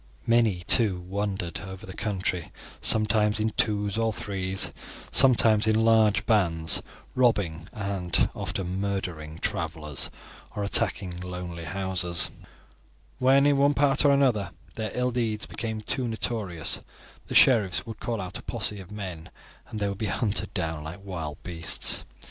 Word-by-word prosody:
Many, 115 -6 +3
too, 95 0 +4
wandered 95 -2 -3
over 95 -1 -9
the 95 - -8
country, 95 -5 -2 0.3
sometimes 105 -1 +3
in 110 +1 0
twos 105 0 0
or 115 0 +1
threes, 95 -2 -2 0.4
sometimes 110 -4 +5
in 110 +1 +3
large 110 -2 +4
bands, 85 -7 +2 0.3
robbing 95 -10 +1
and 100 -5 0
often 95 0 -4
murdering 90 -6 -3
travelers 80 -4 -2 0.5
or 105 - -2
attacking 95 -2 +1
lonely 90 -2 -6
houses. 90 0 0 0.9
When 135 +2 +5
in 145 -1 +4
one 140 +1 +3
part 140 0 +4
or 145 - +5
another 125 -9 +2 0.2
their 110 -1 -3
ill 125 0 0
deeds 115 -3 -1
became 110 -1 -4
too 125 +3 -2
notorious, 110 -7 -1 0.5
the - - -5
sheriffs 105 -8 +4
would 115 -2 -8
call 115 -2 -3
out 90 -2 -4
a - - -10
posse 105 - -2
of 95 +1 -11
men 95 -6 -7 0.4
and 110 - -6
they 100 - 0
would 100 -1 -4
be 110 - -1
hunted 105 +1 0
down 80 -5 -2
like 85 +5 -8
wild 80 -6 -6
beasts. 85 -2 0
100 Hz, 145 wpm, -26 LUFS, 90-110 Hz, 0.9 s, sometimes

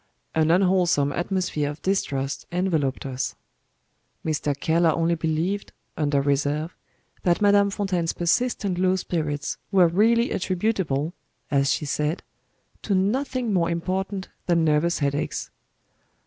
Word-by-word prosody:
An 160 0 +2
unwholesome 180 -5 +3
atmosphere 175 -3 -1
of 150 +2 -7
distrust 140 -8 -1
enveloped 165 -8 0
us. 130 -1 -3 0.9
Mr. 150 -2 -1
Keller 165 +2 +3
only 165 +2 +1
believed, 165 +5 -1 0.2
under 145 -2 +1
reserve, 145 +3 0 0.5
that 175 -1 +2
Madame 200 -1 +4
Fontaine's 190 -5 -1
persistent 195 0 0
low 185 0 +3
spirits 155 -5 -2
were 185 -3 +6
really 225 +7 +3
attributable, 180 -6 -1 0.4
as 140 -1 +3
she 150 - -1
said, 150 +3 -1 0.6
to 200 - 0
nothing 240 +4 0
more 170 -3 +2
important 190 +3 -2 0.2
than 170 -2 +3
nervous 155 +3 +2
headaches. 145 +1 -2
170 Hz, 120 wpm, -24 LUFS, 150-190 Hz, 0.9 s, were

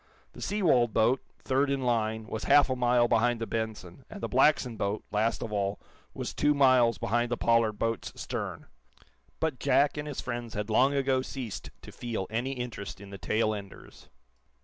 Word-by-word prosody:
The - - -11
Seawold 155 - +2
boat, 120 +4 +3 0.2
third 135 +1 0
in 140 -1 0
line, 110 -2 0
was 110 0 -5
half 145 -2 +5
a - - +1
mile 120 -1 +3
behind 120 +1 +2
the 115 - -2
"Benson," 110 -2 -5
and 210 - -8
the - - -3
Blackson 130 -2 +3
boat, 105 0 -2
last 110 +2 0
of 110 - -5
all, 100 0 -1 0.4
was - - -4
two 150 0 +2
miles 130 -5 +4
behind 120 +3 0
the 120 - -1
Pollard 115 -2 +3
boat's 115 +2 -2
stern. - - -5 0.7
But 160 -5 -1
Jack 140 +2 +3
and 150 0 -4
his 145 - -5
friends 120 -2 -5
had 105 +1 -3
long 135 +6 +4
ago 135 -1 +2
ceased 130 -5 -6
to - - -10
feel 115 -5 -4
any 120 +4 -1
interest 125 -7 -6
in 100 0 -11
the 100 - -8
tail 110 +5 +1
enders. 100 -2 -10
120 Hz, 185 wpm, -29 LUFS, 110-130 Hz, 0.7 s, half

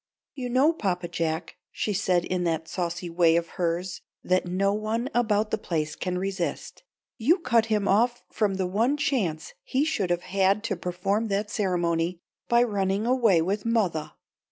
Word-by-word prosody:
"You 250 -3 -5
know, 270 +6 +4
Papa 180 - -2
Jack," 165 -2 -3
she 210 - -2
said 180 -3 +1
in 180 -1 -1
that 165 -1 -1
saucy 175 0 -3
way 165 -1 +3
of 170 0 0
hers 180 0 -2 0.2
that 185 0 +1
no 195 +3 +1
one 220 +5 -2
about 215 -3 +1
the - - 0
place 155 -5 -2
can 180 -1 -3
resist, 190 -2 -3 0.4
"you 295 - +4
cut 235 - +2
him 210 -2 +1
off 240 +4 +2
from 205 -3 0
the 190 -1 -1
one 225 +10 +1
chance 235 - -1
he 270 +3 0
should 205 - -1
have 175 0 0
had 195 +2 +1
to 225 -3 -1
perform 190 +5 -1
that 205 +1 -1
ceremony, 175 -4 0 0.3
by 235 0 +4
running 200 -2 0
away 230 -9 +3
with 200 +4 -1
mothah. 205 -10 0
195 Hz, 170 wpm, -26 LUFS, 175-225 Hz, 0.4 s, know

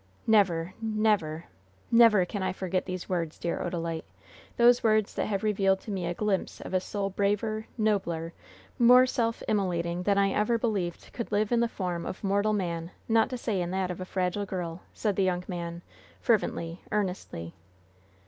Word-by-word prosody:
"Never, 185 -5 +3
never, 215 -8 +1 0.5
never 230 -5 +6
can 200 +2 -4
I 185 - 0
forget 185 0 -2
these 185 -1 -4
words, 170 -4 -2
dear 170 - -2
Odalite! 165 -2 -3 0.5
Those 240 +1 +5
words 215 -2 +3
that - - -1
have 200 -1 -2
revealed 195 -2 +2
to 215 - -7
me 185 -3 -2
a 175 - -1
glimpse 205 -1 -1
of - - -8
a 185 - +4
soul 195 +1 -3
braver, 210 +2 0
nobler, 170 -7 0 0.5
more 250 +1 +8
self 230 -2 -1
immolating 175 -4 0
than 200 +2 +2
I 195 0 +3
ever 215 +4 +2
believed 200 -7 -2
could 235 - -5
live 210 +1 +1
in 240 - +3
the 235 - +3
form 180 -6 -3
of - - -6
mortal 205 +2 +2
man, 170 -4 -2 0.2
not 225 -1 +3
to 255 - -3
say 220 -6 -1
in 175 - -2
that 185 0 -1
of 180 - -6
a - - -4
fragile 185 +2 -1
girl," 175 -2 -4
said 210 -3 -1
the 195 - +3
young 180 -1 0
man, 170 -2 -5 0.4
fervently, 175 -6 0
earnestly. 180 - -3
195 Hz, 175 wpm, -28 LUFS, 175-215 Hz, 0.5 s, more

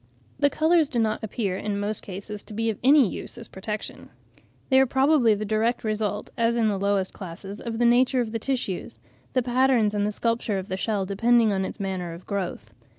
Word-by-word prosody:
The 285 0 +4
colours 315 0 +3
do 245 - -3
not 220 -2 0
appear 205 -3 -2
in 205 0 -3
most 210 +1 -2
cases 200 +2 -7
to 210 - -11
be 225 +1 0
of 215 - -9
any 275 -2 +6
use - - -6
as - - -7
a - - -13
protection; 210 +3 -6 0.6
they 265 -1 +6
are 265 - +4
probably 265 -3 +4
the 210 +1 -4
direct 220 +3 0
result, 215 -1 -2
as 235 -1 +1
in 225 -2 +3
the 200 -2 -1
lowest 200 -1 0
classes, 195 +2 -8
of 230 -2 -4
the 240 - +2
nature 250 +2 +4
of 235 -3 -1
the 225 - -2
tissues; 240 -7 -3 0.4
the 255 - +2
patterns 245 -3 +3
and 205 -1 0
the - - -1
sculpture 230 -1 -1
of 190 +2 -5
the 185 - -1
shell 200 0 -1
depending 225 +2 +3
on 190 -1 0
its - - -7
manner 185 -3 -3
of 170 +2 -11
growth. 200 -3 -4
215 Hz, 215 wpm, -25 LUFS, 200-240 Hz, 0.6 s, any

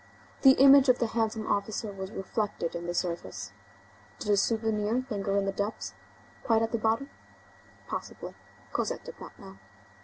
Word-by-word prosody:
The 265 -1 +9
image 275 0 +7
of 250 - +6
the - - +1
handsome 220 -1 -1
officer 205 +1 -1
was 190 -1 -6
reflected 195 -3 -3
in 170 0 -5
the 175 - -2
surface. 170 - -3 0.7
Did 210 - -2
a 205 - +4
souvenir 220 +3 +1
linger 200 -1 0
in 200 - +1
the 195 - 0
depths?—Quite 220 +2 -3
at 225 - -1
the 230 - 0
bottom?—Possibly. 225 +6 -5 0.4
Cosette - - -2
did - - -10
not - - -11
know. 195 0 -13
215 Hz, 150 wpm, -29 LUFS, 195-230 Hz, 0.7 s, The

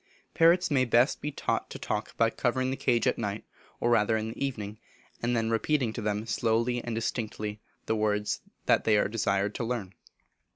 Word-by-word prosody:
Parrots 175 +1 +4
may 135 -3 +4
best 120 +1 +3
be 150 - -3
taught - - -2
to - - -7
talk - - -4
by 115 0 +3
covering 130 +2 0
the - - -1
cage 120 -4 +1
at - - +1
night, 105 -2 -3 0.4
or 120 - +1
rather 110 -1 +3
in 110 0 -3
the 115 - -5
evening, 110 -6 -4 0.4
and 120 0 +1
then 115 0 0
repeating 120 0 +1
to 115 - -4
them 105 0 -1
slowly 115 +2 0
and 120 -2 -3
distinctly, 110 -2 -3 0.2
the 110 - 0
words 105 -1 0 0.2
they 110 -2 +4
are - - +3
desired 100 -1 0
to - - -3
learn. 115 -5 -3
115 Hz, 190 wpm, -29 LUFS, 105-125 Hz, 0.4 s, Parrots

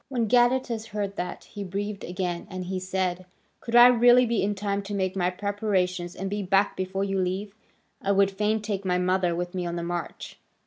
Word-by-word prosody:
When 240 -4 0
Gadatas 240 -1 +2
heard 205 -2 -4
that, 180 - -4
he 205 -2 -8
breathed 200 +2 -4
again, 180 -1 -3
and 185 -1 -5
he 185 +1 -3
said: 185 -1 -2 0.3
"Could 230 - -4
I 240 0 +10
really 245 0 +6
be 235 -2 0
in 205 +1 0
time 200 0 -2
to 200 +1 -5
make 190 -1 -1
my 180 -2 +1
preparations 185 -3 -1
and 195 - -4
be 205 +1 -2
back 195 +1 +2
before 190 +1 -2
you 195 -1 -1
leave? 190 +2 -2 0.5
I 200 - 0
would 200 0 +3
fain 210 +2 0
take 205 -2 -3
my 180 -1 +1
mother 180 -1 +1
with 175 +1 -4
me 185 -1 -2
on 170 - -3
the 170 - -3
march." 175 0 -5
195 Hz, 210 wpm, -26 LUFS, 185-210 Hz, 0.5 s, I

